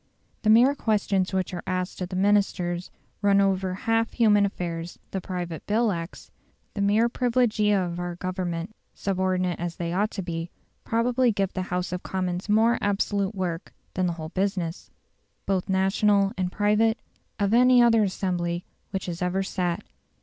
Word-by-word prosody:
The 215 - +1
mere 240 +6 +6
questions 205 -7 0
which 190 -1 -1
are 175 - -4
asked 185 0 -3
of 180 - -3
the 185 - -5
Ministers 185 -3 +1 0.3
run 200 -1 +4
over 190 -1 +1
half 225 +3 0
human 210 -4 +4
affairs; 170 -3 -5
the 190 - -3
Private 175 -3 -5
Bill 220 +1 +2
Acts, 170 -1 -6 0.4
the 205 - -3
mere 210 +4 +3
privilegia 235 -4 +2
of 175 -2 -2
our 175 0 -4
Government 180 +1 -4 0.2
subordinate 185 -2 -1
as 170 -1 -3
they 170 0 -3
ought 205 +4 +1
to 195 - -5
be 165 -1 -4 0.3
probably 240 +2 +2
give 195 -2 -1
the 185 - -2
House 180 0 -2
of 180 0 -3
Commons 185 +1 -3
more 225 +3 +4
absolute 200 0 0
work 175 -3 -4 0.2
than 185 -1 0
the 175 - -1
whole 160 -1 -7
business, 185 -2 -2 0.6
both 190 -2 -1
national 195 +1 +3
and 185 -1 -2
private, 215 +3 +2 0.4
of 205 -1 +1
any 250 +1 +6
other 235 -2 +5
assembly 180 -3 -1 0.2
which 190 -1 -3
has 175 -1 -5
ever 180 +2 0
sat. 180 0 -2
190 Hz, 165 wpm, -26 LUFS, 180-210 Hz, 0.6 s, mere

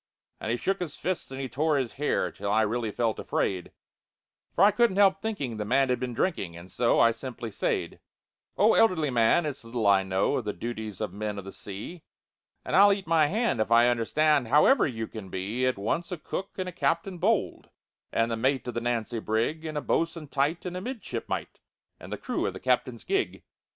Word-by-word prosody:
And - - -4
he 120 - +1
shook 195 +9 -1
his 170 -5 -4
fists 185 +2 -3
and 135 0 -7
he 135 - -3
tore 150 +5 +1
his 130 -4 -2
hair, 145 +2 0
Till 100 0 -5
I 110 +2 +3
really 115 +1 -1
felt 115 +1 -1
afraid, 90 -3 -2 0.8
For 180 - +4
I 205 - +7
couldn't 230 -2 +2
help 195 -1 +4
thinking 145 - -3
the 105 - -2
man 130 +5 +2
had 125 - +1
been 125 -2 -4
drinking, 100 - -1
And 85 +2 -12
so 120 -1 +2
I 115 - +6
simply 120 -1 -6
said: - - -2 0.6
"Oh, 215 +3 +5
elderly 160 -10 +3
man, 120 +7 +3
it's 145 -4 -4
little 115 -1 -3
I 100 -1 +5
know 95 0 0
Of 120 - -3
the 105 - -2
duties 110 -4 -6
of 110 - -3
men 105 0 -4
of 100 - -6
the 95 - -7
sea, 105 - -8 0.6
And - - -1
I'll 200 +1 +8
eat 195 -1 -1
my 160 -2 +4
hand 220 - 0
if 110 - 0
I 120 +1 +6
understand 130 +3 +2
How 145 +6 +5 0.2
you 115 -5 -3
can 110 -2 -9
possibly - - -12 0.3
be 130 - +3
"At 130 - 0
once 165 - -2
a 180 - -3
cook, 190 +5 -5
and 185 -1 -3
a - - -4
captain 170 +3 -1
bold, 205 +3 0 0.4
And 115 +1 +1
the - - 0
mate 130 +3 0
of 125 - -3
the 115 - -2
Nancy 120 -1 -1
brig, 115 +10 -1
And 155 -1 -4
a - - -1
bo'sun 165 -2 -1
tight, 145 +6 0
and 180 0 -4
a 180 - -4
midshipmite, 250 +2 -5 0.4
And - - -11
the - - -3
crew - - -2
of - - -3
the - - -8
captain's - - 0
gig." 390 0 -1
130 Hz, 220 wpm, -27 LUFS, 110-170 Hz, 0.8 s, I'll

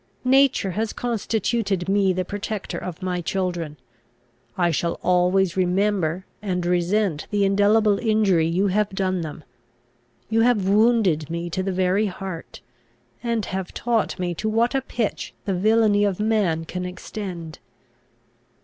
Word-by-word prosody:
Nature 265 -6 +4
has 215 +4 -2
constituted 220 -4 -1
me 195 -1 +3
the 185 0 -1
protector 205 +1 -4
of 180 +1 -7
my 180 -1 -1
children. 175 -4 -2 0.8
I 175 -2 +2
shall 170 +2 -1
always 180 +1 +2
remember 185 -2 +1 0.2
and 180 -4 -2
resent 180 -1 0
the 205 -1 +2
indelible 205 +1 +3
injury 210 -8 +2
you 185 +4 +1
have 210 +2 +1
done 190 -2 -1
them. 155 0 -7 0.8
You 225 0 +2
have 225 -5 +3
wounded 205 -7 +3
me 170 +1 -4
to 185 - -1
the 190 +1 -1
very 190 +3 +1
heart, 185 -2 -7 0.6
and 230 -2 -1
have 190 -1 -5
taught 230 -5 0
me 180 -2 -2
to 215 +6 -2
what 230 +3 +2
a 270 - +1
pitch 240 -4 -3
the 195 - 0
villainy 210 +2 +3
of 200 -2 0
man 205 -7 +1
can 180 +2 -5
extend." 180 -2 -7
195 Hz, 140 wpm, -23 LUFS, 180-215 Hz, 0.8 s, Nature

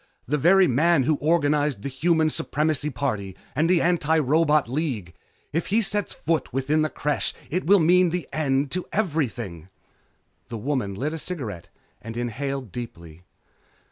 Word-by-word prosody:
The 150 +4 0
very 190 +6 +6
man 150 +3 +3
who 155 +2 +1
organized 150 -6 +1
the - - -2
Human 160 +3 +1
Supremacy 150 0 -1
Party 110 -9 -3 0.2
and 155 +4 +2
the 180 -2 +4
Antirobot 155 -3 +2
League! 125 - -3 0.4
If 165 - -1
he 220 +4 +2
sets 205 +1 0
foot 165 -1 -1
within 135 +4 +1
the 155 - +1
Creche 145 -1 -2 0.2
it 180 +1 -1
will 200 +2 +7
mean 180 +1 +4
an 180 0 -2
end 140 -2 0
to 180 0 -2
everything!" 120 - -2 0.8
The 115 - -5
woman 115 -5 -2
lit 145 +9 -2
a 160 - -4
cigarette 120 - -5 0.3
and 115 +1 -7
inhaled 130 0 -3
deeply. 85 -8 -9
150 Hz, 150 wpm, -24 LUFS, 125-165 Hz, 0.8 s, will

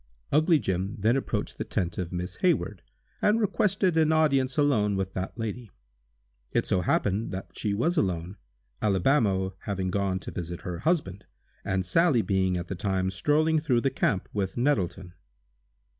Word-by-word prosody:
Ugly 155 +3 +4
Jim 95 -4 -2
then 110 +5 +2
approached 135 - -3
the - - 0
tent 90 0 -2
of 90 -2 -3
Miss 90 0 -4
Hayward, 105 - +1 0.4
and 210 +2 +3
requested 195 -4 +1
an 160 -1 +4
audience 135 -5 +2
alone 110 -9 +2
with 95 0 -2
that 95 +4 -4
lady. 115 0 -4 0.8
It - - +1
so 90 - +1
happened 100 +4 0
that 95 +1 -6
she 105 -2 -1
was 165 - 0
alone, 90 - -1 0.4
Alibamo 95 - +2
having 95 -2 -3
gone 100 -1 0
to - - -7
visit 85 -1 -5
her 90 -1 -5
husband, 145 - -1 0.4
and 95 -1 -1
Sally 130 - +3
being 95 -2 +1
at 90 0 -5
the - - -4
time 95 0 -1
strolling 155 - +2
through 130 -6 +1
the 135 - +1
camp 95 -3 0
with 100 0 -2
Nettleton. 95 -8 0
100 Hz, 160 wpm, -27 LUFS, 95-145 Hz, 0.8 s, Ugly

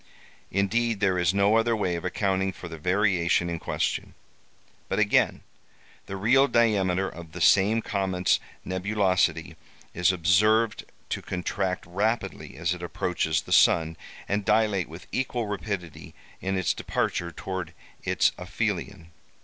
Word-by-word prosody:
Indeed, 110 +3 0
there 95 -3 +2
is 90 -1 +3
no 100 +3 +3
other 115 0 +2
way 90 -5 -1
of 85 - -5
accounting 95 0 0
for 90 - -9
the 80 -2 -8
variation 90 -1 +1
in 85 - -3
question. - - -2 0.7
But - - -1
again:—The 95 - -2
real 130 +8 +4
diameter 95 -6 +2
of 85 -3 -10
the 90 - -7
same 105 +6 +4
comet's 95 -2 +1 0.3
nebulosity 95 -4 0 0.4
is 90 +1 +3
observed 105 +6 +2 0.2
to - - -2
contract 90 +1 -3
rapidly 105 +6 -2
as 85 +2 0
it 90 - -8
approaches 85 -2 -1
the - - -11
sun, 80 0 +4 0.3
and 100 +1 0
dilate 105 -4 +2
with 80 +1 -10
equal 125 -2 -1
rapidity 100 -5 -5 0.3
in 95 0 -1
its 95 -4 +1
departure 85 0 -2
towards 95 0 -5 0.3
its - - +2
aphelion. 95 -2 -3
95 Hz, 135 wpm, -26 LUFS, 90-105 Hz, 0.7 s, real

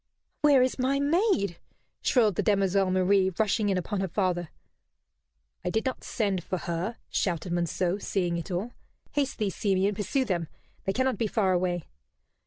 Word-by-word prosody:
"Where 285 -4 +6
is 255 +1 -1
my 270 +2 +2
maid?" 285 - +2 0.4
shrilled 225 -5 +3
the - - 0
demoiselle 195 -2 +2
Marie, 185 +1 +3
rushing 215 0 +2
in 190 - +1
upon 190 +3 -2
her 190 - 0
father. 175 -2 -1 1.1
"I 180 - -1
did 220 +6 0
not 260 - -2
send 200 -6 -1
for 185 - -2
her," 175 +7 -3
shouted 175 -1 -1
Monceux, 175 +2 0
seeing 175 -3 0
it 170 - -5
all. 195 +7 -3 0.4
"Haste 280 -2 -1
thee, 210 -3 0
Simeon, 195 0 +1
pursue 220 +6 0
them. 175 -7 -1 0.4
They 195 - 0
cannot 260 +2 0
be 225 - +1
far 195 -3 +2
away." 175 -1 0
195 Hz, 165 wpm, -28 LUFS, 180-230 Hz, 1.1 s, Where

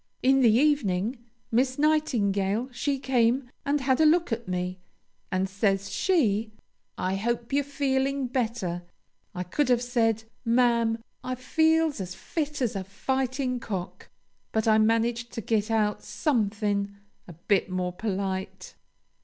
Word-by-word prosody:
In 270 +1 +5
the 235 -3 +6
evening, 240 -5 +2 0.3
Miss 255 +3 +2
Nightingale 235 -8 +1
she 275 +3 -1
came 250 -1 +1
and 285 0 0
had 260 +2 +2
a - - +6
look 340 -1 +3
at 230 -1 -3
me, 180 0 -3 0.5
and 185 0 +1
says 195 0 0
she, 225 - +1 0.5
'I 185 +1 -1
hope 235 +4 -2
you're 285 +1 +3
feeling 275 -1 0
better.' 230 -8 -2 0.5
I 180 - -2
could 255 - 0
have 245 -1 +3
said, 225 -2 +1 0.2
'Ma'am, 230 -1 +2 0.2
I 255 0 -2
feels 320 +1 +2
as 180 -1 -6
fit 295 - -3
as 230 - -1
a 195 - -2
fightin' 260 +5 -2
cock,' 190 -6 -6 0.4
but 220 0 0
I 220 0 +5
managed 230 +2 +1
to 230 - -4
git 215 +1 0
out 215 -2 +1
somethin' 205 -6 0 0.3
a 175 - -9
bit 190 +5 0
more 180 -1 -2
polite." 190 -1 -4
230 Hz, 140 wpm, -27 LUFS, 200-265 Hz, 0.5 s, the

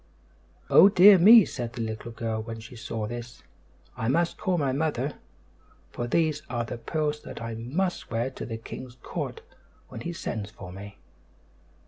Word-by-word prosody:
"Oh, 195 - +8
dear 195 0 +8
me," 215 +3 +9
said 120 -4 -5
the 120 - -5
little 110 +1 -5
girl 115 -1 -3
when 115 0 -7
she 115 +3 -11
saw 115 -2 -4
this, 120 +2 -8 0.5
"I 110 - -3
must 170 +6 +1
call 185 -1 -1
my 140 -4 +1
mother; 145 -1 -2 0.7
for 120 - -4
these 155 +2 +1
are 120 -2 -2
the 115 - -6
pearls 150 +1 -2
that - - -9
I 115 0 -5
must 145 +12 -2
wear 115 +3 -1
to - - -8
the 115 -1 -4
king's 120 +2 -9
court 455 - -5 0.5
when - - -8
he 170 - -4
sends 110 - -4
for 90 -4 -10
me." 100 +2 -10
120 Hz, 170 wpm, -27 LUFS, 115-160 Hz, 0.7 s, me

